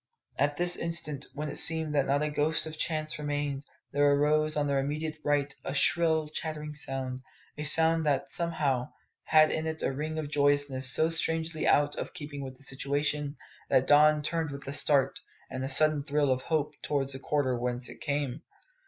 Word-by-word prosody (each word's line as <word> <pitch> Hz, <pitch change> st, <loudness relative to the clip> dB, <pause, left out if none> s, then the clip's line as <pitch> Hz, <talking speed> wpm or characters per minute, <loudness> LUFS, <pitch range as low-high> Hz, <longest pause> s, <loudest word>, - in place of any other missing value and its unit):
At 145 Hz, +1 st, +1 dB
this 175 Hz, 0 st, +1 dB
instant, 160 Hz, -4 st, 0 dB
when 150 Hz, +1 st, -4 dB
it -, -, -5 dB
seemed 160 Hz, -1 st, +2 dB
that 140 Hz, -2 st, +1 dB
not 140 Hz, +2 st, +1 dB
a 150 Hz, -, -1 dB
ghost 150 Hz, +2 st, 0 dB
of 160 Hz, -, -7 dB
a -, -, -8 dB
chance 155 Hz, -1 st, -2 dB
remained, 145 Hz, -1 st, -3 dB, 0.3 s
there 145 Hz, 0 st, +3 dB
arose 155 Hz, +1 st, +2 dB
on 150 Hz, -1 st, 0 dB
their 140 Hz, -1 st, +1 dB
immediate 155 Hz, +3 st, -3 dB
right 145 Hz, -1 st, 0 dB
a 135 Hz, -, -4 dB
shrill 160 Hz, +1 st, +4 dB
chattering 150 Hz, 0 st, -5 dB
sound 135 Hz, -3 st, -4 dB, 0.3 s
a 150 Hz, -, -5 dB
sound 160 Hz, +2 st, +4 dB
that, 140 Hz, -2 st, 0 dB
somehow, 145 Hz, -7 st, -1 dB, 0.3 s
had 155 Hz, -1 st, +5 dB
in 160 Hz, 0 st, -2 dB
it 160 Hz, 0 st, -4 dB
a -, -, 0 dB
ring 155 Hz, +3 st, -4 dB
of 155 Hz, -2 st, -3 dB
joyousness 145 Hz, -3 st, +2 dB
so 160 Hz, +6 st, +2 dB
strangely 160 Hz, 0 st, -1 dB
out 145 Hz, 0 st, +3 dB
of -, -, -6 dB
keeping 145 Hz, -1 st, -7 dB
with 130 Hz, -1 st, -8 dB
the 135 Hz, -, -12 dB
situation 145 Hz, +2 st, -1 dB, 0.3 s
that 130 Hz, -, +3 dB
Don 150 Hz, +1 st, +5 dB
turned 160 Hz, +1 st, -2 dB
with 140 Hz, -1 st, -9 dB
a 140 Hz, -, -4 dB
start 145 Hz, -2 st, +2 dB, 0.3 s
and 130 Hz, -, -4 dB
a 135 Hz, -, -3 dB
sudden 155 Hz, -1 st, +5 dB
thrill 145 Hz, -1 st, +1 dB
of 130 Hz, 0 st, 0 dB
hope 150 Hz, -1 st, -1 dB
towards 140 Hz, -2 st, -1 dB
the 130 Hz, -, -6 dB
quarter 140 Hz, -2 st, 0 dB
whence 125 Hz, +1 st, -3 dB
it -, -, -12 dB
came. 145 Hz, -1 st, -2 dB
145 Hz, 195 wpm, -29 LUFS, 140-155 Hz, 0.3 s, had